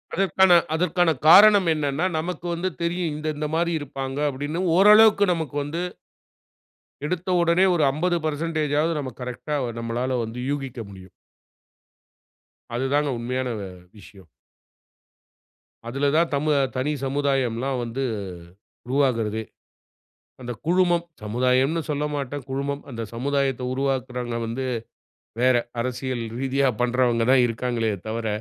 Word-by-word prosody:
அதற்கான 190 -1 +4 0.2
அதற்கான 175 +1 +2 0.2
காரணம் 200 +2 +8
என்னனென்னா? 150 +1 -1
நமக்கு 175 +2 -5
வந்து 175 +2 -1
தெரியும் 170 -1 -1
இந்த 155 +1 -5
இந்த 150 +1 -3
மாரி 170 +1 +1
இருப்பாங்க, 135 -1 -5
அப்படின்னு 145 +4 -4 0.2
ஓரளவுக்கு 210 +1 +7
நமக்கு 160 -5 -4
வந்து. 155 +4 -4 1.2
எடுத்த 180 +3 -3
உடனே 170 +2 +3
ஒரு 160 - +2
50% 155 -1 0
நம்ம 135 -3 -4
கரெக்ட்‌டா 125 +4 -4 0.2
நம்மளால 120 +2 -2
வந்து 115 +2 -6
யூகிக்க 135 -4 -4
முடியும். 95 -1 -12 1.7
அதுதாங்க 140 +4 +1
உண்மையான 125 +2 -2
வ - - -5 0.4
விஷயம். 95 -3 -16 1.6
அதுல 135 +4 -1
தான் 170 0 +3
தமுவ 150 +1 +1 0.2
தனி 135 +4 0
சமுதாயம்லாம் 135 -2 0
வந்து 120 +3 -3 0.8
உருவாகுறதே. 115 -5 0 1.0
அந்த 120 -1 -5 0.2
"குழுமம்" 175 -1 +2 0.2
சமுதாயம்ன்னு 130 +8 +1
சொல்லமாட்டேன். 145 -2 -3
குழுமம் 140 +1 -3
அந்த 115 -2 -5
சமுதாயத்தை 135 +1 -1
உருவாக்குறவங்க 130 -3 -2
வந்து 120 +4 -3 0.8
வேற. 130 0 +4 0.2
அரசியல் 125 0 -3 0.2
ரீதியா 135 0 +1
பண்ணுறவங்க 120 -1 +2
தான் 130 -2 +5
இருக்காங்களே 115 -1 -1 0.2
தவிர. 115 +1 -3
140 Hz, 110 wpm, -24 LUFS, 125-160 Hz, 1.7 s, காரணம்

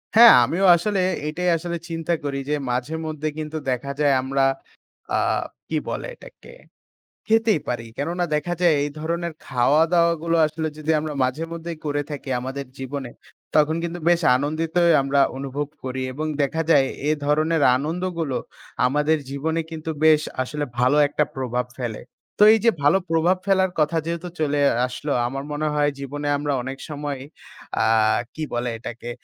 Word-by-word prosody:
হ্যাঁ, 235 0 +10
আমিও 175 +10 +1
আসলে 195 +3 -1 0.3
এটাই 180 +4 -1
আসলে 170 +1 -4
চিন্তা 165 +1 -2
করি 140 -1 -2
যে 150 - +2
মাঝেমধ্যে 155 +4 -2
কিন্তু 155 0 -4
দেখা 125 +3 -3
যায় 145 -2 +4
আমরা 135 +1 +1 0.7
আ - - +2 0.5
কি - - -1
বলে - - -4
এটাকে - - -15 0.8
খেতেই 220 -6 +3
পারি। 120 -2 -3
কেননা 170 +5 -1
দেখা 175 +4 -1
যায় 170 -3 +5
এই 145 - -2
ধরনের 170 +1 -2
খাওয়া-দাওয়া 165 +7 +3
গুলো 170 0 +1
আসলে 155 +1 -3
যদি 155 +1 -3
আমরা 155 0 -4
মাঝেমধ্যেই 165 +5 -3
করে 145 0 0
থাকি 145 -1 -6
আমাদের 135 +2 -5
জীবনে, 135 -1 -5 0.5
তখন 155 +1 +3
কিন্তু 170 +1 -4
বেশ 175 0 +4 0.2
আনন্দিতই 165 +4 +1
আমরা 140 +1 +1 0.2
অনুভব 140 +2 -3 0.2
করি 130 0 -3
এবং 155 +4 -3 0.2
দেখা 160 +4 0
যায় 135 -4 +5 0.2
এ - - +3 0.2
ধরনের 155 +1 +2
আনন্দগুলো 165 -1 -2 0.5
আমাদের 150 +4 +2
জীবনে 160 +4 -1
কিন্তু 160 0 -5
বেশ 155 -1 +6 0.2
আসলে 145 +3 -3
ভালো 125 +4 +3
একটা 150 +1 +1
প্রভাব 125 -1 -2
ফেলে। 120 -4 -4 0.4
তো - - +4
এই - - +3
যে 230 - +7
ভালো 150 +7 +5
প্রভাব 165 +3 +3
ফেলার 190 -1 +3
কথা 155 +2 +1
যেহেতু 170 +1 -3
চলে 145 -1 +1 0.3
আসলো 140 +3 -4
আমার 135 +2 -4
মনে 150 +1 -1
হয় 145 0 +2
জীবনে 145 +2 -4
আমরা 145 0 -1
অনেক 135 +1 -6
সময় 145 -2 -4 0.7
আ - - +3 0.5
কি 155 - -5
বলে 120 +1 -1
এটাকে 120 +1 -7
150 Hz, 160 wpm, -23 LUFS, 140-165 Hz, 0.8 s, হ্যাঁ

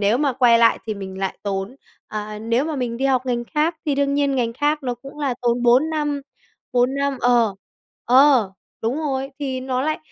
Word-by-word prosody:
nếu 210 +4 +2
mà 285 -2 +1
quay 240 -2 +4
lại 230 0 +4
thì 215 - -2
mình 190 -1 -7
lại 195 -1 -3
tốn 200 +4 -3 0.3
ờ, 210 0 -5
nếu 230 +5 0
mà 310 -1 -3
mình 245 -3 -2
đi 265 - -2
học 260 -1 +1
ngành 240 -1 -1
khác 310 +6 0
thì 290 - +1
đương 280 0 +1
nhiên 280 -1 +1
ngành 235 -2 0
khác 295 +4 0
nó 250 -2 -2
cũng 275 +4 -13
là 275 -4 -1
tốn 240 0 +1
4 250 +6 +4
năm, 295 -2 -1 0.5
4 250 +2 +2
năm 280 -1 -1
ờ. 235 -4 +3 0.5
Ờ, 255 -5 +5 0.3
đúng 230 +4 0
rồi, 270 -3 -2
thì 265 -3 -3
nó 255 0 -2
lại 310 +2 -1
255 Hz, 215 wpm, -21 LUFS, 230-280 Hz, 0.5 s, Ờ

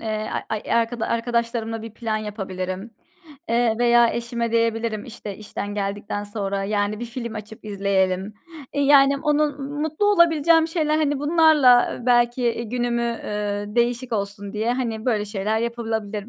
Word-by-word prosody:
eee, 215 -1 -3 0.2
ay 215 -1 -3
ay - - -3
arkada 230 0 +1
arkadaşlarımla 230 -1 -1
bir 225 - -7
plan 225 -2 -2
yapabilirim. 195 -1 -5 0.6
Eee, 235 -1 +2
veya 240 -1 +5
eşime 235 -1 -3
diyebilirim, 230 -2 0
işte, 215 -4 -8
işten 205 -1 -6
geldikten 205 0 -3
sonra, 200 -2 -3
yani, 205 +1 -1
bir 240 - -3
film 235 -1 -6
açıp 215 +1 -9
izleyelim. 195 -1 0 0.4
E, 285 - -1
yani, 280 0 +5
onun 295 -2 0
m 290 - -4
mutlu 315 +7 0
olabileceğim 330 -4 +4
şeyler, 310 -2 0
hani, 290 -2 +1
bunlarla 295 -5 +5
belki, 240 0 +3
eee, 235 -1 0
günümü, 240 +1 -1
eee, 210 -3 -3
değişik 240 +1 0
olsun 200 -1 -3
diye, 220 +3 0
hani, 230 -3 -3
böyle 215 -4 +1
şeyler 210 +1 -1
yapılabilir 225 -3 -3
230 Hz, 150 wpm, -23 LUFS, 210-245 Hz, 0.6 s, veya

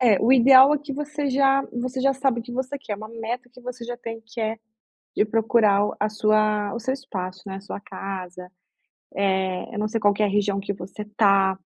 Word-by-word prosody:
É, 225 -6 +4
o 235 +4 +4
ideal 265 +2 +7
é 295 - 0
que 290 0 -7
você 295 0 -3
já 270 +1 +3
você 255 +2 -3
já 275 +1 +3
sabe 265 -3 0
o - - -8
que 240 +1 -10
você 260 +3 -3
quer. 245 - -7
É - - -2
uma 215 +1 -9
meta 230 +2 -5
que 250 - -15
você 250 -1 -7
já 240 +1 -5
tem 230 -1 -7
que 225 +1 -8
é 220 0 -1 0.6
de - - +4
procurar 215 -2 +3
o - - -5
a 210 - +1
sua 215 -1 +1
o 235 - -3
seu 260 +3 -1
espaço, 185 -9 -6
né, 190 -1 -5
a - - -8
sua 200 - -7
casa. 185 -2 -7 1.0
Eh, 185 +5 -5
eu - - -3
não 210 - 0
sei 225 +1 -2
qual 205 -1 +3
que 200 - -3
é - - +4
a - - 0
região 200 0 0
que 200 +1 -3
você 190 +2 -9
está 195 -2 +2
225 Hz, 240 wpm, -24 LUFS, 205-255 Hz, 1.0 s, ideal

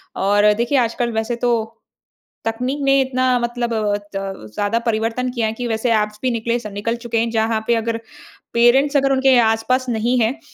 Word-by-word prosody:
और 205 +2 +3
देखिए, 235 +6 0
आजकल 235 0 0
वैसे 225 +2 -2
तो 240 - +3 0.9
तकनीक 250 +5 -2
ने 275 0 +4
इतना 255 -1 0
मतलब 240 0 -2
अ, 210 -2 0 0.2
त 195 - -5
ज़्यादा 205 +3 0
परिवर्तन 230 +3 0
किया 235 -3 -1
है 220 - -2
कि 245 - -2
वैसे 230 +1 0
एप्स 210 0 -4
भी 255 -1 0
निकले 235 +1 -1
स 235 - -7
निकल 230 +3 -1
चुके 230 -1 -1
हैं 230 +1 +1
जहाँ 220 -1 0
पे 235 - +3
अगर 230 0 -1 0.6
पेरेंट्स 265 +5 +4
अगर 275 0 +2
उनके 265 -1 +4
आस-पास 235 +3 +1
नहीं 240 +2 +1
हैं, 235 +6 0
235 Hz, 190 wpm, -19 LUFS, 220-250 Hz, 0.9 s, ने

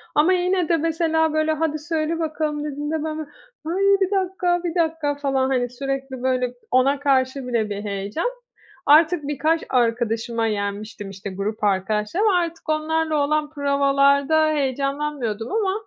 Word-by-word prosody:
Ama 320 +5 +4
yine 360 -1 +1
de 335 - +4
mesela, 320 0 +1
böyle: 310 0 +1
"Hadi, 310 -1 -1
söyle 315 +1 -2
bakalım." 305 -2 -2
dediğinde 295 +1 -3
ben 310 0 -3
böyle: 305 -2 -6 0.4
"Ay, 330 - -2 0.3
bir 385 +1 +1
dakika, 365 -2 0
bir 345 -1 -3
dakika!" 320 -4 0
falan, 270 -2 0
hani, 245 -2 0
sürekli, 270 0 -4
böyle, 250 -1 0 0.2
ona 270 +2 +3
karşı 265 -1 +1
bile 230 -3 0
bir 205 0 -4
heyecan. 200 - -2 0.5
Artık 315 +2 +5
birkaç 310 +3 0
arkadaşıma 230 -1 0
yenmiştim, 205 0 -4
işte, 195 +1 -7
grup 200 +3 -4
arkadaşlarıma. 210 - +1
Artık 335 -2 -3
onlarla 315 0 0
olan 305 0 0
provalarda 280 +1 +3
heyecanlanmıyordum 275 -5 -2
ama, 405 -3 +1
290 Hz, 145 wpm, -22 LUFS, 250-320 Hz, 0.5 s, Artık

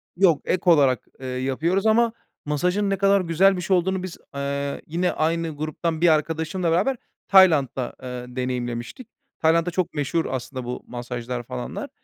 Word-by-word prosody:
Yok, 175 -5 +4
ek 180 - 0
olarak, 140 -6 +4
eee, 130 - -7
yapıyoruz 135 +10 -1
ama 225 +1 +4 0.3
masajın 180 +7 0
ne 195 - 0
kadar 195 0 +4
güzel 185 +3 +3
bir - - -3
şey 185 +1 +2
olduğunu 185 +1 -1
biz, 185 - -6 0.2
eee, 140 0 -3
yine 175 +3 0
aynı 165 0 -1
gruptan 155 +2 -3
bir 175 - +5
arkadaşımla 160 +3 0
beraber 205 +10 +2 0.3
Tayland'da, 150 -10 +4
eee, 125 0 -7
deneyimlemiştik. 125 - -4 0.3
Tayland'da 165 +2 +3
çok 180 0 -1
meşhur 160 +3 -1
aslında 130 0 -4
bu 125 - -5
masajlar 120 0 -5
falanlar. 60 - -6
160 Hz, 155 wpm, -23 LUFS, 130-180 Hz, 0.3 s, bir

